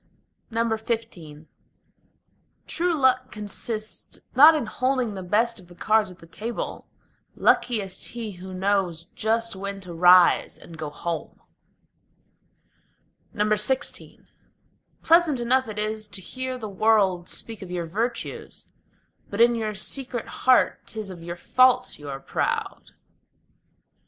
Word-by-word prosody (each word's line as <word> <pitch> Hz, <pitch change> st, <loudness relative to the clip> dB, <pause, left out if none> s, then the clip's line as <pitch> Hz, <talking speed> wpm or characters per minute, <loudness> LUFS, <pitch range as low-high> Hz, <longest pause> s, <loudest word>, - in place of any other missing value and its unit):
XV 220 Hz, -9 st, -3 dB, 1.2 s
True 345 Hz, +1 st, 0 dB
luck 255 Hz, -2 st, +2 dB
consists 215 Hz, +1 st, -6 dB, 0.2 s
not 305 Hz, +5 st, +9 dB
in 300 Hz, -, -1 dB
holding 255 Hz, 0 st, -1 dB
the 190 Hz, -, -6 dB
best 220 Hz, +5 st, +1 dB
of 180 Hz, -, -16 dB
the 175 Hz, -, -15 dB
cards 215 Hz, +3 st, +2 dB
at 180 Hz, -, -12 dB
the -, -, -15 dB
table: 220 Hz, +8 st, -5 dB, 0.5 s
Luckiest 205 Hz, -6 st, +1 dB
he 230 Hz, -3 st, -6 dB
who 185 Hz, +1 st, -9 dB
knows 185 Hz, -3 st, 0 dB
just 225 Hz, 0 st, 0 dB
when 200 Hz, +1 st, -5 dB
to 180 Hz, -2 st, -7 dB
rise 180 Hz, +1 st, +5 dB
and 170 Hz, -, -13 dB
go 155 Hz, -2 st, -5 dB
home. 165 Hz, +3 st, -5 dB, 2.0 s
XVI 215 Hz, +4 st, 0 dB, 0.8 s
Pleasant 330 Hz, -5 st, +4 dB
enough 255 Hz, +2 st, +2 dB
it 215 Hz, -1 st, -7 dB
is 215 Hz, 0 st, -2 dB
to 205 Hz, -, -4 dB
hear 255 Hz, +6 st, -5 dB
the 220 Hz, -3 st, -6 dB
world 195 Hz, -3 st, +2 dB
speak 225 Hz, -3 st, -6 dB
of 190 Hz, -, -8 dB
your 175 Hz, -1 st, -3 dB
virtues; 230 Hz, +8 st, -4 dB, 0.6 s
But 200 Hz, -, -5 dB
in 240 Hz, +1 st, +6 dB
your 220 Hz, -2 st, -2 dB
secret 250 Hz, +4 st, -3 dB
heart 255 Hz, -1 st, +3 dB
'tis 215 Hz, -3 st, -5 dB
of 175 Hz, -2 st, -10 dB
your 170 Hz, +1 st, -6 dB
faults 255 Hz, +5 st, +3 dB
you 145 Hz, -1 st, -8 dB
are 135 Hz, -1 st, -5 dB
proud. -, -, -3 dB
215 Hz, 125 wpm, -25 LUFS, 185-240 Hz, 2.0 s, not